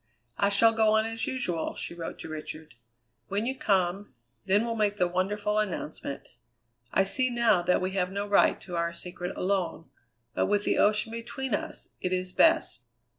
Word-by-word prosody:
"I 200 - +4
shall 225 +3 +5
go 220 -1 +3
on 220 0 +3
as 225 0 -3
usual," 175 -11 -2
she - - -5
wrote 170 -1 -6
to - - -7
Richard. 155 -2 -7 0.5
"When 200 +3 -1
you 260 +2 -1
come, 190 - 0 0.3
then 205 +4 +3
we'll 230 -1 -2
make 210 -2 +1
the 180 - +3
wonderful 205 +4 0
announcement. 165 -8 -4 0.6
I 195 - +4
see 255 +6 +1
now 235 -6 +3
that 180 +1 +2
we 185 +1 -1
have 185 -1 -1
no 200 +1 -2
right 205 -1 +4
to 180 - -7
our 170 0 -1
secret 180 +1 -6
alone; 185 -3 -1 0.4
but - - +1
with 205 0 +1
the - - +1
ocean 210 +2 +3
between 235 +2 -4
us, - - -4
it 180 - -1
is 185 0 -2
best." 325 - +3
200 Hz, 180 wpm, -28 LUFS, 180-220 Hz, 0.6 s, shall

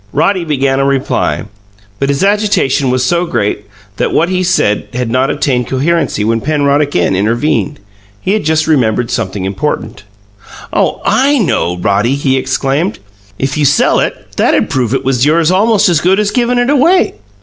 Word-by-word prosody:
Roddy 180 +5 +1
began 135 -4 0
a - - +2
reply, 135 -1 -1 0.6
but 140 - -1
his 140 +6 0
agitation 200 -10 +1
was 130 0 0
so 175 +5 0
great 105 -5 -2 0.3
that - - -1
what 170 +3 +1
he 185 0 0
said 175 - 0
had 125 -1 -2
not 130 +2 +1
attained 130 -4 -1
coherency 145 -3 0
when 115 +1 0
Penrod 145 0 +1
again 100 -11 0
intervened. 120 +9 -1 0.4
He 190 - -1
had 215 - -1
just 155 +1 +1
remembered 120 -6 +1
something 100 -4 -3
important. 105 +1 -3 0.7
"Oh, - - 0
I 265 +8 +2
know, 90 - 0
Roddy!" 105 +7 +1
he 140 -2 0
exclaimed. 135 +6 -1 0.4
"If 135 +2 -2
you - - +1
sell 145 +1 +3
it, - - -3
that'd - - +1
prove 125 -1 0
it - - -3
was 130 -2 +1
yours 160 +3 +3
almost 210 +2 +3
as 170 -4 +2
good 190 +3 +2
as 210 -1 0
givin' 245 +1 0
it 245 +3 +1
away. 330 +7 +3
145 Hz, 170 wpm, -12 LUFS, 125-185 Hz, 0.7 s, sell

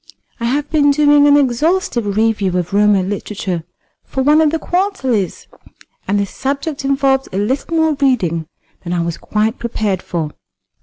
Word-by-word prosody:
I 235 - -3
have 285 +5 0
been 295 -2 +3
doing 290 0 +5
an 290 0 +6
exhaustive 255 - 0
review 210 -5 +1
of 180 +2 -3
Roman 205 -2 +3
literature 195 -4 -4 0.4
for 265 - -3
one 300 +3 +5
of 310 - +4
the 325 - -1
quarterlies, 315 - -1 0.6
and 205 +2 +1
the 200 - +1
subject 280 - -4
involved 270 -1 +1
a 190 - -4
little 265 +10 -1
more 320 -1 +3
reading 175 - +1 0.4
than 175 - -4
I 175 -1 0
was 170 -1 -4
quite 215 +3 -1
prepared 215 -5 -2
for." 160 -5 -3
240 Hz, 160 wpm, -17 LUFS, 200-290 Hz, 0.6 s, an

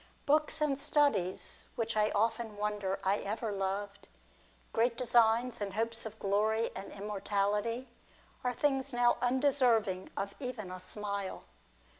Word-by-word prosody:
j - - -26 0.2
Books 305 +1 +2
and 285 -2 +1
studies, 280 -12 +1
which 230 -1 -2
I 210 0 +3
often 225 0 0
wonder 205 -2 -1
I 195 +2 +3
ever 215 +2 -3
loved, 200 0 -3 0.3
\ - - -31
great 235 +1 +2
designs, 235 -1 +3
and 200 -1 -3
hopes 225 0 -1
of 220 0 -10
glory 215 +3 +1
and 195 - -6
immortality, 210 +4 -1 0.6
are! 250 - +1
things 270 +1 +1
now 240 0 +4
undeserving 245 -7 +2
of 200 0 -2
even 245 -8 -5
a 185 - -6
smile. 200 0 -4
220 Hz, 140 wpm, -32 LUFS, 200-245 Hz, 0.6 s, now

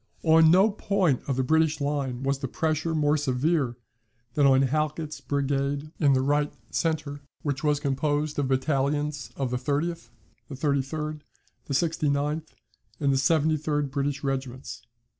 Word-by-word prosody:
On 160 0 +6
no 190 +6 +5
point 190 - +1
of 135 - 0
the 130 - +1
British 160 +2 +2
line 140 -3 -2
was 135 0 0
the 135 - -3
pressure 160 +4 -1
more 150 0 +2
severe 140 -1 0 0.6
than 145 0 +4
on 135 0 +5
Halkett's 150 +1 -2
brigade 140 +2 -1
in 145 -3 +4
the 130 0 +2
right 145 +1 +1 0.2
centre 150 -3 -1 0.2
which 140 -2 -2
was 150 -1 +2
composed 145 +1 -1
of 140 - +1
battalions 140 0 0
of 135 -3 -2
the 125 - 0
30th, 150 +6 -2 0.4
the 140 - -6
33d, 150 +2 -1 0.5
the 140 - -2
69th, 150 0 0 0.5
and 140 -2 +2
the - - +2
73d 150 0 +1
British 140 0 -2
regiments. 130 -2 -4
145 Hz, 145 wpm, -26 LUFS, 135-155 Hz, 0.6 s, On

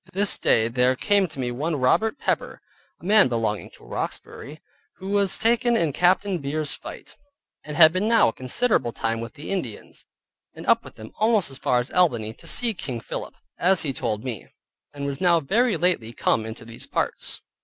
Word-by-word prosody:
This 200 +2 0
day 110 0 +3
there 125 +2 +2
came 200 +7 +2
to 155 -4 -8
me 125 -1 -1
one 150 +7 -2
Robert 180 - +2
Pepper - - -2 0.4
(a - - -14
man 210 -2 +5
belonging 115 -4 -2
to - - -20
Roxbury) 150 +2 -6 0.4
who 190 - -8
was 200 -2 +2
taken 235 +1 +2
in 160 -8 0
Captain 185 +2 +2
Beers's 145 +1 -1
fight, - - -9 0.5
and 150 0 -7
had 160 -1 +8
been 190 +4 0
now 230 0 +5
a - - -6
considerable 130 - 0
time 115 0 -2
with 115 +5 -8
the 150 +4 -7
Indians; 130 - -5 0.5
and - - -9
up - - +3
with - - -13
them 110 -1 -11
almost 215 -7 +2
as 135 - -6
far 125 - +1
as 125 - -4
Albany, 120 -12 +1
to - - -17
see 235 -2 +2
King 130 - -5
Philip, 105 - -7 0.2
as 185 +1 +3
he 140 -4 -2
told 110 -5 -2
me, 120 -7 -5 0.4
and 140 -1 -6
was 140 +4 -4
now 175 -2 +4
very 220 - +1
lately 170 -11 0
come 110 -1 0
into 110 +1 -9
these 115 0 -7
parts. - - -2
150 Hz, 195 wpm, -24 LUFS, 120-195 Hz, 0.5 s, had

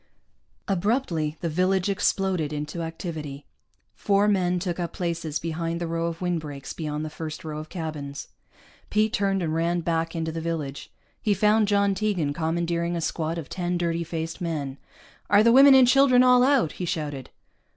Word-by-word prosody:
Abruptly 185 - 0
the 170 - -1
village 185 +3 +1
exploded 190 -5 0
into 150 +3 -4
activity. 160 -4 -6 0.5
Four 200 0 +2
men 180 -3 +2
took 180 -1 -3
up 170 -2 -3
places 165 -3 -2
behind 165 +1 -3
the 175 - -2
row 165 0 -1
of 165 0 -5
windbreaks 155 -6 -3
beyond 150 -1 -4
the - - -4
first 155 -1 -6
row 155 -1 -4
of 155 - -8
cabins. 150 -5 -6 0.6
Pete 215 +1 +1
turned 195 -2 +1
and 155 -1 -1
ran 170 +2 0
back 165 0 -1
into 160 -1 -2
the 165 0 -4
village. 155 -4 -4 0.3
He 205 -2 +2
found 210 +2 +3
John 200 -1 +2
Tegan 185 -8 -1
commandeering 170 +2 -1
a - - -1
squad 160 +1 -2
of 165 - -6
ten 180 -1 -2
dirty 170 -1 -1
faced 165 +2 -5
men. 145 -5 -3 0.5
"Are 205 +1 +6
the 235 - +5
women 270 +2 +8
and 260 -2 +7
children 255 -1 +5
all 250 -1 +6
out?" 260 - +3
he 180 - -5
shouted. 145 -6 -4
170 Hz, 170 wpm, -25 LUFS, 160-195 Hz, 0.6 s, women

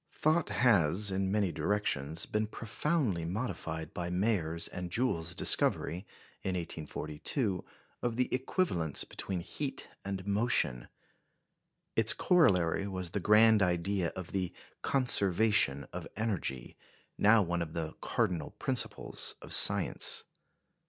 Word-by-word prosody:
Thought 155 +2 +1
has, 100 -4 +3
in 95 0 -1
many 100 -3 +1
directions, 80 -3 -1
been 105 0 -1
profoundly 115 - -2
modified 85 -4 -4
by 85 -1 -4
Mayer's 90 -4 -1
and 90 0 -6
Joule's 90 -6 -1
discovery, 90 +3 +2 0.3
in 95 - -2
1842, 85 - -3 0.4
of 120 -2 -2
the 125 +1 +1
equivalence 125 - +1
between 95 -3 -4
heat 135 - -5
and 95 -1 -5
motion. 100 - +1 1.1
Its - - +4
corollary 100 - +2
was 95 -3 -5
the 100 - -2
grand 105 +2 +5
idea 90 0 0
of 95 -2 -7
the 95 -2 -2 0.3
"conservation 105 - +2
of - - -6
energy," 95 - -3 0.4
now 105 +1 +5
one 85 -1 -2
of 80 -2 -5
the 80 -2 -4
cardinal 80 -5 -2
principles - - -1
of - - -6
science. - - +5
95 Hz, 120 wpm, -31 LUFS, 85-110 Hz, 1.1 s, grand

